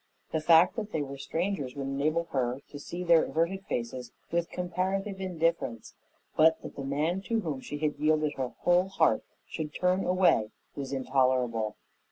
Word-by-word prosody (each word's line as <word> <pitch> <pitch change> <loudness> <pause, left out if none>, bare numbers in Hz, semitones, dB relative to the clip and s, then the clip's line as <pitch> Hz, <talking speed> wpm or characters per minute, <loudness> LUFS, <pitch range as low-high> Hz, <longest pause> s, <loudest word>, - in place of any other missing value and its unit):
The 160 - 0
fact 170 +6 +5
that 215 -2 -4
they 155 - 0
were 140 0 -7
strangers 165 -5 -2
would 140 -1 -4
enable 145 +5 0
her 125 -2 0
to 145 - -8
see 175 +5 -5
their 170 -2 +5
averted 185 +4 -1
faces 120 +1 -3 0.2
with 170 0 0
comparative 190 +3 -2
indifference, 165 - -1 0.4
but 160 +1 +5
that - - -8
the 140 - -5
man 150 +7 0
to 230 -1 +1
whom 150 -8 -3
she 145 - -6
had 150 -1 -1
yielded 155 0 +2
her 130 -1 -2
whole 175 +1 +4
heart 170 -4 +2 0.2
should 150 -1 -5
turn 185 +1 +2
away 180 - +3 0.3
was 135 -1 -5
intolerable. 130 -5 +1
155 Hz, 170 wpm, -29 LUFS, 135-180 Hz, 0.4 s, fact